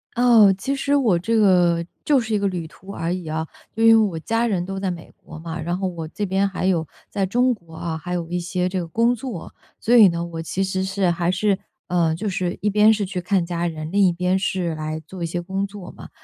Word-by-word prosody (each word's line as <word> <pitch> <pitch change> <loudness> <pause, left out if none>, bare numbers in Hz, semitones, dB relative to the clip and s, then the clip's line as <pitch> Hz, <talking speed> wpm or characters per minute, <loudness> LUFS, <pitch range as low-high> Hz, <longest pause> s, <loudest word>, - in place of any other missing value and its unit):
哦， 230 -5 +6
其 270 +8 -2
实 280 +1 -1
我 235 -11 +3
这 225 +7 0
个， 175 -5 +4 0.2
就 290 -3 +3
是 230 -2 -3
一 210 - +2
个 200 - +1
旅 175 -4 -3
途 190 +4 -17
而 165 -2 -2
已 180 -3 -5
啊。 160 +1 -3 0.3
就 225 - -4
因 225 - +8
为 220 -1 +4
我 165 -4 -5
家 225 +7 0
人 190 -6 0
都 195 +1 -5
在 190 -1 -1
美 170 -2 -9
国 160 - -10
嘛， 165 +1 -6
然 175 +3 -2
后 190 0 -1
我 170 -3 -5
这 205 +5 -3
边 195 +1 +1
还 190 -1 -3
有 175 -4 +1 0.2
在 200 -2 -1
中 245 +6 +2
国 170 -7 -14
啊， 160 0 -4
还 175 +3 -5
有 170 -2 -3
一 175 - -1
些 180 +1 -1
这 185 +1 -3
个 170 - -4
工 230 +8 +2
作。 225 -7 -7 0.3
所 240 - +2
以 215 -5 +9
呢， 170 0 -2
我 165 -1 -6
其 185 +4 -2
实 190 0 -2
是 190 -1 0
还 170 0 0
是， 195 +1 +1 0.3
呃， 170 -3 +2
就 185 +7 -4
是 185 -2 -2
一 210 - +1
边 210 +2 +5
是 210 -2 -1
去 185 -1 -4
看 185 -1 +1
家 170 0 -2
人， 155 -2 -5
另 200 +2 +3
一 180 - +4
边 180 +2 0
是 185 -4 -1
来 155 0 -4
做 185 0 -7
一 - - 0
些 175 +1 -3
工 190 +3 -2
作 200 -2 -9
嘛， - - -12
185 Hz, 275 characters per minute, -22 LUFS, 170-205 Hz, 0.3 s, 以